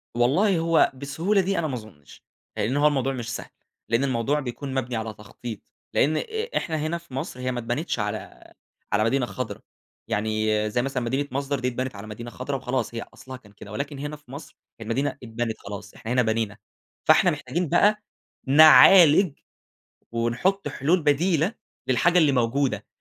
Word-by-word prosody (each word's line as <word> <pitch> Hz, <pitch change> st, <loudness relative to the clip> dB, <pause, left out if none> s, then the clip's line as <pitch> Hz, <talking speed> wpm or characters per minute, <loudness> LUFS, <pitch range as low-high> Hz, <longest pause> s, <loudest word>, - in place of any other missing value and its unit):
والله 165 Hz, -, +3 dB
هو 165 Hz, 0 st, +3 dB
بالسهولة 160 Hz, +10 st, 0 dB
دي، 195 Hz, +1 st, -1 dB
أنا 165 Hz, -, -1 dB
ما 140 Hz, -, -4 dB
أظنش؛ 95 Hz, -11 st, -14 dB, 0.4 s
لأنّ 120 Hz, +7 st, 0 dB
هو 145 Hz, +1 st, +5 dB
الموضوع 135 Hz, -2 st, 0 dB
مش 120 Hz, -3 st, -5 dB
سهل. -, -, -7 dB, 0.4 s
لأن 115 Hz, +4 st, +2 dB
الموضوع 135 Hz, +2 st, 0 dB
بيكون 135 Hz, +1 st, -5 dB
مبنِي 130 Hz, -2 st, -2 dB
على 110 Hz, -1 st, -3 dB
تخطيط، 110 Hz, +2 st, -9 dB, 0.3 s
لأن 155 Hz, +3 st, +2 dB
إ 445 Hz, -, -3 dB
إحنا 160 Hz, -, -2 dB
هنا 155 Hz, +3 st, -2 dB
في 170 Hz, -6 st, -16 dB
مصر 130 Hz, -1 st, -5 dB
هي 130 Hz, 0 st, -2 dB
ما 125 Hz, -, -3 dB
اتبنتش 120 Hz, +4 st, -2 dB
على 105 Hz, -, -5 dB, 0.4 s
على 105 Hz, +1 st, +3 dB
مدينة 125 Hz, +3 st, +1 dB
خَضرا، 125 Hz, -1 st, -6 dB, 0.5 s
يعني 110 Hz, 0 st, 0 dB
زي 120 Hz, +3 st, 0 dB
مثلًا 130 Hz, -1 st, -2 dB
مدينة 135 Hz, +4 st, -1 dB
مصدر 140 Hz, +1 st, -2 dB
دي 125 Hz, -, -1 dB
اتبنت 125 Hz, -1 st, -3 dB
على 100 Hz, +2 st, -9 dB
مدينة 115 Hz, +3 st, -7 dB
خضرا 130 Hz, +4 st, -4 dB
وخلاص، 130 Hz, -2 st, -3 dB
هي 115 Hz, -, -3 dB
أصلها 130 Hz, 0 st, -10 dB
كان 105 Hz, -5 st, -20 dB
كده، 100 Hz, 0 st, -12 dB
ولكن 140 Hz, +5 st, -4 dB
هنا 145 Hz, +1 st, -5 dB
في 145 Hz, -4 st, -18 dB
مصر 140 Hz, 0 st, -10 dB, 0.2 s
هي -, -, -7 dB
المدينة 130 Hz, +6 st, -1 dB
اتبنت 115 Hz, -1 st, -3 dB
خلاص، 100 Hz, 0 st, -8 dB
إحنا 110 Hz, -, -7 dB
هنا 125 Hz, 0 st, +3 dB
بنينا، 110 Hz, -2 st, -1 dB, 0.5 s
فإحنا -, -, +6 dB
محتاجين 175 Hz, -2 st, -3 dB
بقى 210 Hz, +4 st, +3 dB, 0.4 s
نعالج، 155 Hz, +3 st, +7 dB, 0.7 s
ونحط 120 Hz, +13 st, 0 dB
حلول 165 Hz, +6 st, +1 dB
بديلة 160 Hz, +6 st, +2 dB, 0.3 s
للحاجة 130 Hz, +8 st, +3 dB
اللي 155 Hz, -4 st, +4 dB
موجودة. 130 Hz, +2 st, 0 dB
130 Hz, 175 wpm, -25 LUFS, 115-150 Hz, 0.7 s, نعالج